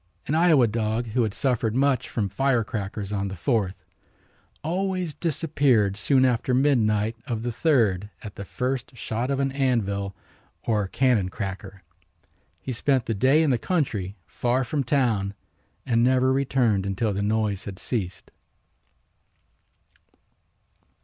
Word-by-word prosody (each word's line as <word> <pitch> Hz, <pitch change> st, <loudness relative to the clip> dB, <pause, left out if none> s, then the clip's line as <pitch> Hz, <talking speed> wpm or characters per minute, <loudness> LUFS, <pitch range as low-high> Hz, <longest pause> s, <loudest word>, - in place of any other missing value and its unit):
An 145 Hz, -, -2 dB
Iowa 160 Hz, -6 st, +5 dB
dog 110 Hz, +1 st, -1 dB
who 125 Hz, +3 st, +1 dB
had 110 Hz, -3 st, +1 dB
suffered 120 Hz, -5 st, 0 dB
much 130 Hz, -2 st, +1 dB
from 105 Hz, -4 st, -1 dB
firecrackers 105 Hz, -3 st, -1 dB
on 100 Hz, -1 st, -1 dB
the 95 Hz, -, -5 dB
Fourth 100 Hz, -1 st, -1 dB, 0.8 s
always 180 Hz, 0 st, -1 dB
disappeared 140 Hz, -, +1 dB
soon 130 Hz, +5 st, +3 dB
after 125 Hz, 0 st, +1 dB
midnight 115 Hz, -5 st, +2 dB
of 115 Hz, -2 st, -3 dB
the 120 Hz, -, -1 dB
third 110 Hz, -, +2 dB
at 105 Hz, -3 st, -7 dB
the 100 Hz, -, -7 dB
first 125 Hz, +4 st, -3 dB
shot 120 Hz, +2 st, -3 dB
of 140 Hz, -1 st, 0 dB
an 135 Hz, -1 st, +1 dB
anvil 100 Hz, -8 st, 0 dB, 0.5 s
or 105 Hz, -3 st, 0 dB
cannon 115 Hz, -4 st, +2 dB
cracker. 95 Hz, -1 st, -6 dB, 0.8 s
He 130 Hz, -, -4 dB
spent 130 Hz, +1 st, +1 dB
the 115 Hz, -, -1 dB
day 130 Hz, +9 st, +4 dB
in 150 Hz, -, +2 dB
the 120 Hz, -, +1 dB
country 110 Hz, -, -1 dB
far 125 Hz, +2 st, 0 dB
from 140 Hz, +3 st, -1 dB
town 115 Hz, -7 st, +1 dB, 0.5 s
and 115 Hz, -2 st, +2 dB
never 130 Hz, +1 st, +3 dB
returned 125 Hz, -7 st, +1 dB
until 100 Hz, +2 st, -1 dB
the 100 Hz, -, -2 dB
noise 105 Hz, -1 st, 0 dB
had 95 Hz, -2 st, -7 dB
ceased. 95 Hz, -6 st, -4 dB
115 Hz, 135 wpm, -25 LUFS, 100-135 Hz, 0.8 s, Iowa